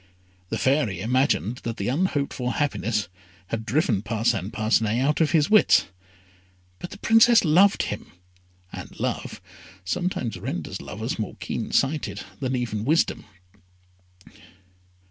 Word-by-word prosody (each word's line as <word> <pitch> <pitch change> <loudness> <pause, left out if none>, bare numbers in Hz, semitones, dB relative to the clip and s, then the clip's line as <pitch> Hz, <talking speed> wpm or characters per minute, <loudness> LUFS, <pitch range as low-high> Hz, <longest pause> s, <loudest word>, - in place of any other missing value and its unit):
The - - -2
Fairy 130 - +1
imagined 125 - +1
that 115 -1 -5
the 100 - -3
unhoped 145 0 0
for 125 -2 -2
happiness 110 -8 -1 0.4
had 110 -1 -4
driven 120 - +1
Parcin 110 -3 -1
Parcinet 110 +1 +1
out 145 +5 +1
of 155 - +3
his 155 -4 +3
wits; 215 - +5 0.9
but 175 - -7
the - - -10
Princess 225 0 +5
loved 185 +6 +4
him, 105 - -6 0.6
and - - -9
love - - -3 0.5
sometimes 120 - -2
renders 85 -4 -5
lovers - - -5
more - - -4
keen - - -5
sighted 145 +3 0 0.2
than 130 -2 -1
even 115 -4 -2
wisdom. 155 +7 +1
125 Hz, 125 wpm, -24 LUFS, 110-155 Hz, 0.9 s, wits